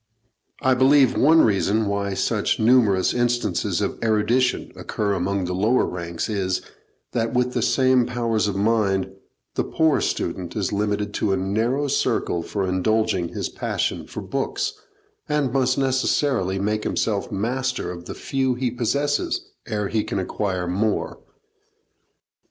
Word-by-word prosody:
I 130 -1 +4
believe 130 0 +5
one 160 +4 +5
reason 105 +1 +2
why 100 -1 -1
such - - 0
numerous 110 -5 +4
instances 120 0 0
of - - -2
erudition 115 +3 +1
occur 105 -1 -2
among 95 +1 -1
the 90 - -3
lower 110 +7 +2
ranks 85 -2 -4
is, 95 -4 -1 0.5
that, 115 +1 -1
with 125 0 +1
the 120 - 0
same 130 0 +3
powers 115 -3 0
of 100 - -2
mind, 100 -2 +1 0.4
the - - 0
poor 160 -3 +2
student 90 -2 -2
is 105 -3 -1
limited 105 0 -1
to 100 - 0
a - - +1
narrow 115 +9 0
circle 90 -9 0
for 95 +3 -3
indulging 95 -1 +1
his - - -3
passion - - -2
for - - -6
books, - - -2 0.6
and 145 -4 0
must 130 -2 +2
necessarily 130 -6 +1
make 105 +2 -1
himself 105 -3 -1
master 120 0 -2
of 85 -1 -9
the - - -7
few 130 -2 -1
he 125 -1 -1
possesses 145 - -1 0.2
ere 105 -4 -1
he 110 0 0
can - - -3
acquire 95 -1 -2
more. 100 +4 -1
110 Hz, 145 wpm, -23 LUFS, 100-130 Hz, 0.6 s, believe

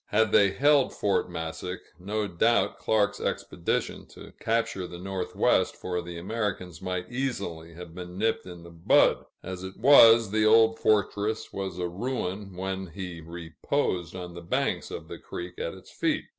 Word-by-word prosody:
Had 110 0 +2
they 100 -2 +6
held 145 +5 +3
Fort 100 -2 0
Massac, 85 +2 -5 0.2
no 105 +3 -2
doubt 115 +6 +2
Clark's 105 -2 +1
expedition - - -2
to - - -13
capture 110 -5 -1
the 85 - -9
Northwest 95 +1 0
for 90 -1 -3
the 85 0 -8
Americans 95 -2 -3
might 90 +2 -4
easily 100 -11 -4
have 90 -1 -10
been 90 0 -8
nipped 110 -1 0
in 90 -2 -10
the 85 - -12
bud; 85 0 +3 0.2
as 95 0 -6
it 95 0 -8
was, 115 -4 +7
the 110 0 +2
old 110 +1 +5
fortress 105 +1 0
was 95 -2 -4
a 90 -1 -1
ruin 100 -1 -4
when 95 0 -3
he 90 -1 -7
"reposed" 85 - -3
on 90 -1 -7
the 85 - -8
banks 85 - -1
of - - -7
the - - -8
creek 90 0 -8
at 85 - -3
its 95 - -15
feet. - - -1
95 Hz, 165 wpm, -27 LUFS, 90-110 Hz, 0.2 s, was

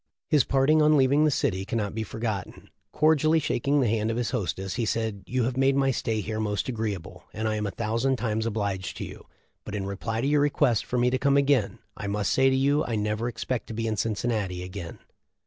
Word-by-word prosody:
His 150 -3 +4
parting 140 +3 +3
on 150 0 +5
leaving 140 +3 +4
the - - +4
city 115 -9 0
cannot 105 -1 -2
be 110 - -3
forgotten. 110 -3 -5 0.2
Cordially 155 +1 +3
shaking 140 -1 +1
the 125 - +2
hand 110 0 0
of 115 - -1
his 120 -2 -1
hostess 95 -5 -2
he 120 - -1
said: 110 -2 -1
'You 125 0 0
have 125 +2 -1
made 135 +1 +3
my 135 -1 +3
stay 110 -3 -1
here 110 +2 -4
most 105 -2 -1
agreeable, 110 -8 -4
and 110 0 -2
I 110 - 0
am 105 -1 -1
a - - -1
thousand 115 +5 0
times 110 -1 -1
obliged 100 -4 -3
to - - -4
you; - - -11 0.4
but 105 - -6
in 100 -2 -3
reply 110 +3 -3
to - - -1
your 145 0 +3
request 135 -5 +2
for 125 - -2
me 125 +1 +3
to 130 - 0
come 140 0 +3
again, 140 -7 +2 0.2
I 100 - -5
must 100 -1 0
say 135 0 +4
to 130 - +2
you 140 +3 +2
I 115 - -2
never 105 +2 -1
expect 120 +1 -3
to 110 - -6
be 115 +1 -2
in 110 -1 0
Cincinnati 105 -4 -1
again. 90 -2 -7
115 Hz, 230 wpm, -26 LUFS, 105-135 Hz, 0.4 s, on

